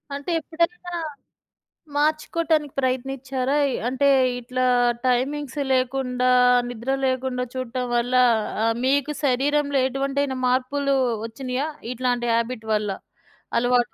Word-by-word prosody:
అంటే 285 Hz, +5 st, -4 dB
ఎప్పుడైనా 340 Hz, +5 st, -2 dB, 1.0 s
మార్చుకోవటానికి 310 Hz, 0 st, +1 dB
ప్రయత్నిచ్చారా? 260 Hz, +1 st, -1 dB, 0.3 s
అంటే 265 Hz, +3 st, +1 dB, 0.3 s
ఇట్లా 255 Hz, +1 st, -2 dB, 0.4 s
టైమింగ్స్ 270 Hz, +3 st, 0 dB
లేకుండా 255 Hz, -1 st, 0 dB, 0.4 s
నిద్ర 245 Hz, +2 st, -4 dB
లేకుండా 260 Hz, -1 st, -1 dB
చూడటం 255 Hz, -1 st, -3 dB
వల్ల 240 Hz, +1 st, 0 dB, 0.5 s
ఆహ్, 225 Hz, 0 st, +2 dB
మీకు 285 Hz, +2 st, +1 dB
శరీరంలో 285 Hz, +2 st, +1 dB
ఎటువంటివంటైనా 270 Hz, 0 st, -1 dB
మార్పులు 275 Hz, +2 st, +1 dB, 0.3 s
వచ్చినియా? 255 Hz, +4 st, -3 dB, 0.3 s
ఇట్లాంటి 245 Hz, -1 st, -1 dB
హ్యాబిట్ 230 Hz, 0 st, -2 dB
వల్ల, 210 Hz, -1 st, 0 dB, 0.7 s
అలవాటు 245 Hz, 0 st, +2 dB
260 Hz, 95 wpm, -23 LUFS, 250-285 Hz, 1.0 s, ఆహ్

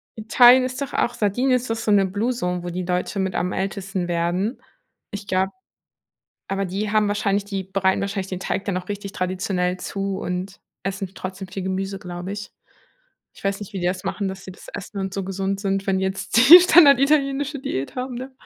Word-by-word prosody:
Italien 245 Hz, +3 st, +6 dB
ist 255 Hz, +1 st, -4 dB
doch 280 Hz, -, -4 dB
auch 240 Hz, -, +1 dB
Sardinien 240 Hz, +4 st, +1 dB
ist 250 Hz, -1 st, -2 dB
doch 225 Hz, -, 0 dB
so 225 Hz, -1 st, -1 dB
'ne 200 Hz, -2 st, +5 dB
Blue 210 Hz, +6 st, -1 dB
Zone, 180 Hz, -6 st, -2 dB
wo 175 Hz, -, -4 dB
die 180 Hz, +1 st, -3 dB
Leute 180 Hz, +3 st, -2 dB
mit 190 Hz, -1 st, -1 dB
am 180 Hz, +1 st, 0 dB
ältesten 195 Hz, -1 st, -3 dB
werden. 175 Hz, +7 st, -1 dB, 0.5 s
Ich 205 Hz, -1 st, -7 dB
glaub 190 Hz, +1 st, +1 dB, 1.0 s
Aber 195 Hz, 0 st, -1 dB
die 200 Hz, +3 st, -3 dB
haben 215 Hz, -1 st, +3 dB
wahrscheinlich 200 Hz, -1 st, 0 dB
die 200 Hz, -1 st, -3 dB
bereiten 190 Hz, 0 st, 0 dB
wahrscheinlich 195 Hz, -1 st, -3 dB
den 185 Hz, -1 st, -5 dB
Teig 195 Hz, -, -2 dB
dann 195 Hz, -, -2 dB
auch 180 Hz, +1 st, -5 dB
richtig 200 Hz, -1 st, -5 dB
traditionell 185 Hz, -1 st, -1 dB
zu 195 Hz, 0 st, -3 dB
und 185 Hz, +1 st, -4 dB, 0.2 s
essen 195 Hz, -1 st, -4 dB
trotzdem 190 Hz, +1 st, -6 dB
viel 190 Hz, +1 st, -6 dB
Gemüse, 190 Hz, +1 st, -3 dB
glaube 180 Hz, +1 st, -6 dB
ich. 205 Hz, 0 st, -7 dB, 0.8 s
Ich -, -, -17 dB
weiß 195 Hz, +1 st, -1 dB
nicht, 205 Hz, 0 st, -9 dB
wie -, -, -2 dB
die 175 Hz, -, -1 dB
das 180 Hz, +1 st, -2 dB
machen, 200 Hz, -, -2 dB
dass 190 Hz, 0 st, -7 dB
sie 185 Hz, -, -7 dB
das -, -, -15 dB
essen 200 Hz, +1 st, -7 dB
und 190 Hz, -1 st, -3 dB
so 195 Hz, -, -3 dB
gesund 195 Hz, +1 st, -2 dB
sind, 195 Hz, -1 st, -1 dB
wenn 190 Hz, -1 st, +1 dB
die 190 Hz, -, 0 dB
jetzt 190 Hz, +3 st, -2 dB
die 350 Hz, +2 st, +13 dB
standarditalienische 285 Hz, -3 st, +4 dB
Diät 135 Hz, -, -4 dB
haben, 255 Hz, 0 st, -4 dB
ne? 260 Hz, +2 st, -7 dB
195 Hz, 210 wpm, -22 LUFS, 185-215 Hz, 1.0 s, die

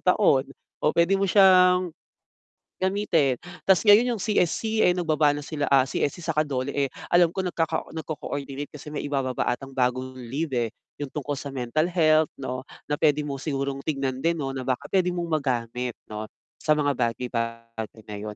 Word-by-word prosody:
taon, 160 Hz, -9 st, +4 dB, 0.3 s
o -, -, +2 dB
pwede 170 Hz, +3 st, +4 dB
mo 195 Hz, -, +1 dB
siyang, 185 Hz, -2 st, +5 dB, 0.9 s
gamitin. 185 Hz, -, +1 dB, 0.2 s
Tas 190 Hz, -2 st, +5 dB
ngayon 225 Hz, +3 st, +6 dB
yung 210 Hz, -, -5 dB
CSC, 220 Hz, +2 st, +1 dB
eh, 180 Hz, -, +5 dB
nagbaba 155 Hz, -4 st, +2 dB
na 145 Hz, -, -4 dB
sila, 145 Hz, 0 st, -3 dB
ah, 135 Hz, -, +7 dB
CSC 145 Hz, +4 st, -1 dB
saka 155 Hz, -2 st, 0 dB
DOLE 130 Hz, -1 st, -2 dB
eh, 140 Hz, -1 st, +1 dB, 0.2 s
alam 175 Hz, -1 st, +4 dB
ko 190 Hz, -, -1 dB
nagkaka 165 Hz, -3 st, -2 dB
nagko-coordinate, 145 Hz, -3 st, -5 dB
kasi 150 Hz, 0 st, -10 dB
may 150 Hz, -, -2 dB
ibababa 135 Hz, -4 st, -1 dB
atang 135 Hz, +2 st, -4 dB
bagong 130 Hz, 0 st, 0 dB
leave, 130 Hz, +4 st, -4 dB
eh, 120 Hz, -2 st, 0 dB, 0.3 s
yung 140 Hz, -, -3 dB
tungkol 145 Hz, 0 st, -4 dB
sa 140 Hz, 0 st, -5 dB
mental 135 Hz, +5 st, -1 dB
health 155 Hz, -3 st, +4 dB
'no, 130 Hz, -1 st, -4 dB, 0.2 s
na 145 Hz, -, -3 dB
pwede 150 Hz, -1 st, +3 dB
mo 140 Hz, -2 st, -5 dB
sigurong 140 Hz, -2 st, -2 dB
tignan 135 Hz, -3 st, -2 dB
din 165 Hz, 0 st, +1 dB
'no, 135 Hz, -3 st, -3 dB
na 135 Hz, -, -4 dB
baka 130 Hz, 0 st, -2 dB
pwede 180 Hz, -2 st, +3 dB
mong 175 Hz, -1 st, -2 dB, 0.2 s
magamit 125 Hz, -2 st, -2 dB
'no, 110 Hz, 0 st, -6 dB, 0.3 s
sa 155 Hz, -1 st, +3 dB
mga 145 Hz, -1 st, +2 dB
bagay-bagay 115 Hz, -2 st, -3 dB
na 105 Hz, -, -8 dB
yun. 105 Hz, 0 st, -6 dB
145 Hz, 175 wpm, -25 LUFS, 130-170 Hz, 0.9 s, ah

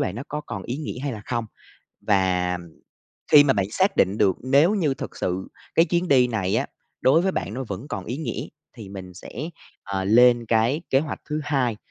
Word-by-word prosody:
bạn 90 Hz, -, -2 dB
nó 115 Hz, -, -5 dB
có 150 Hz, -, -3 dB
còn 105 Hz, -9 st, -7 dB
ý 120 Hz, -, -4 dB
nghĩa 150 Hz, -4 st, -5 dB
hay 140 Hz, -1 st, -2 dB
là 105 Hz, -, -7 dB
không? 120 Hz, -2 st, -2 dB, 0.6 s
Và, 95 Hz, -2 st, +1 dB
ừm, 90 Hz, -, -6 dB, 0.7 s
khi 145 Hz, -1 st, +9 dB
mà 140 Hz, -, +4 dB
bạn 100 Hz, -6 st, 0 dB
xác 190 Hz, -, +1 dB
định 95 Hz, +3 st, +2 dB
được 95 Hz, -3 st, +3 dB
nếu 140 Hz, -, +4 dB
như 155 Hz, -9 st, +1 dB
thực -, -, -7 dB
sự 95 Hz, +1 st, -2 dB, 0.3 s
cái 165 Hz, -, +6 dB
chuyến 175 Hz, +1 st, 0 dB
đi 130 Hz, -4 st, +5 dB
này 110 Hz, -4 st, -1 dB
á, 135 Hz, -, 0 dB, 0.3 s
đối 155 Hz, +6 st, +4 dB
với 190 Hz, +1 st, +1 dB
bạn 105 Hz, -, -3 dB
nó 130 Hz, +2 st, -4 dB
vẫn 100 Hz, +8 st, -6 dB
còn 100 Hz, -6 st, -4 dB
ý 120 Hz, -, -4 dB
nghĩa 160 Hz, -, -4 dB, 0.3 s
thì 110 Hz, -4 st, -9 dB
mình 95 Hz, -2 st, -9 dB
sẽ, -, -, -11 dB, 0.5 s
à, 95 Hz, -1 st, -3 dB
lên 120 Hz, +3 st, +5 dB
cái 115 Hz, +7 st, +2 dB
kế 135 Hz, -, +5 dB
hoạch 150 Hz, 0 st, -5 dB
thứ 150 Hz, -, -1 dB
hai 135 Hz, -6 st, 0 dB
120 Hz, 220 wpm, -24 LUFS, 100-145 Hz, 0.7 s, khi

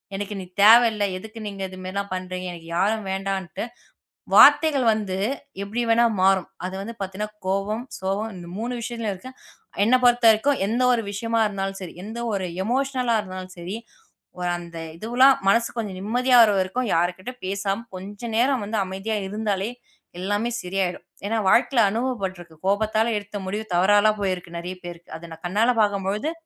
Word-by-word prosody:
எனக்கு 205 Hz, +1 st, -4 dB
நீ 185 Hz, -, -6 dB, 0.2 s
தேவை 230 Hz, +4 st, +9 dB
இல்ல. 210 Hz, -1 st, -1 dB
எதுக்கு 220 Hz, +4 st, -10 dB
நீங்க 200 Hz, -1 st, -6 dB
இது 185 Hz, -, -10 dB
மாரிலாம் 200 Hz, +2 st, -4 dB
பண்றீங்க? 185 Hz, 0 st, -4 dB
எனக்கு 165 Hz, -1 st, -11 dB
யாரும் 215 Hz, +4 st, +1 dB
வேண்டான்டு, 195 Hz, -3 st, -3 dB, 0.7 s
வார்த்தைகள் 295 Hz, -5 st, +7 dB
வந்து 205 Hz, -4 st, -2 dB, 0.5 s
எப்பிடி 220 Hz, +4 st, -2 dB
வேணா 235 Hz, +1 st, +5 dB, 0.2 s
மாறும். 190 Hz, -1 st, +3 dB, 0.2 s
அது 185 Hz, -, -6 dB
வந்து 230 Hz, +3 st, -7 dB
பாத்தீங்கன்னா 195 Hz, +2 st, -4 dB, 0.2 s
கோவம், 200 Hz, +5 st, -1 dB
சோகம் 200 Hz, +4 st, -2 dB
இந்த 175 Hz, -1 st, -9 dB
3 235 Hz, +3 st, -3 dB
விஷயத்துலயும் 230 Hz, -3 st, -3 dB
இருக்கு. 190 Hz, +8 st, -10 dB, 0.5 s
என்ன 230 Hz, +4 st, +4 dB
பொறுத்தவரைக்கும் 240 Hz, +2 st, +4 dB
எந்த 235 Hz, +5 st, 0 dB
ஒரு 235 Hz, -2 st, +1 dB
விஷயமா 230 Hz, +3 st, -1 dB
இருந்தாலும் 195 Hz, -1 st, -3 dB
சரி, 180 Hz, -3 st, -7 dB
எந்த 220 Hz, +3 st, -7 dB
ஒரு 195 Hz, -2 st, -1 dB, 0.2 s
எமோஷனலா 255 Hz, 0 st, +1 dB
இருந்தாலும் 185 Hz, -1 st, -8 dB
சரி, 175 Hz, +4 st, -5 dB, 0.6 s
ஒ -, -, -7 dB, 0.2 s
அந்த 170 Hz, -1 st, -9 dB, 0.2 s
இதுவுலாம் 255 Hz, +6 st, +5 dB
மனசு 230 Hz, +3 st, +4 dB
கொஞ்சம் 205 Hz, -5 st, -4 dB
நிம்மதியா 245 Hz, +5 st, +2 dB
வர 220 Hz, -, +6 dB
வரைக்கும் 205 Hz, +6 st, -1 dB
யார்கிட்ட 180 Hz, +7 st, -1 dB
பேசாம 200 Hz, +3 st, -2 dB
கொஞ்சம் 205 Hz, +5 st, -7 dB
நேரம் 255 Hz, 0 st, +2 dB
வந்து 215 Hz, +2 st, -2 dB
அமைதியா 195 Hz, +4 st, -3 dB
இருந்தாலே! 210 Hz, 0 st, -2 dB, 0.5 s
எல்லாமே 205 Hz, +5 st, -1 dB
சரியாயிடும். 180 Hz, 0 st, -2 dB, 0.2 s
ஏன்னா 225 Hz, +2 st, 0 dB
வாழ்க்கையில 240 Hz, +4 st, +4 dB
அனுபவபட்டு 220 Hz, -5 st, -2 dB
இருக்கு. 170 Hz, -2 st, -13 dB
கோபத்தால 215 Hz, +3 st, +2 dB
எடுத்த 205 Hz, 0 st, -9 dB
முடிவு 210 Hz, +3 st, -3 dB
தவறாலாம் 205 Hz, +4 st, +4 dB
போயிருக்கு 185 Hz, -3 st, -2 dB
நிறைய 180 Hz, +2 st, -5 dB
பேருக்கு. 170 Hz, -1 st, -9 dB
அத 170 Hz, +1 st, -10 dB
நான் 160 Hz, +1 st, -12 dB
கண்ணால 210 Hz, +7 st, +2 dB
பார்க்கும்பொழுது 205 Hz, +6 st, 0 dB
205 Hz, 160 wpm, -24 LUFS, 190-230 Hz, 0.7 s, தேவை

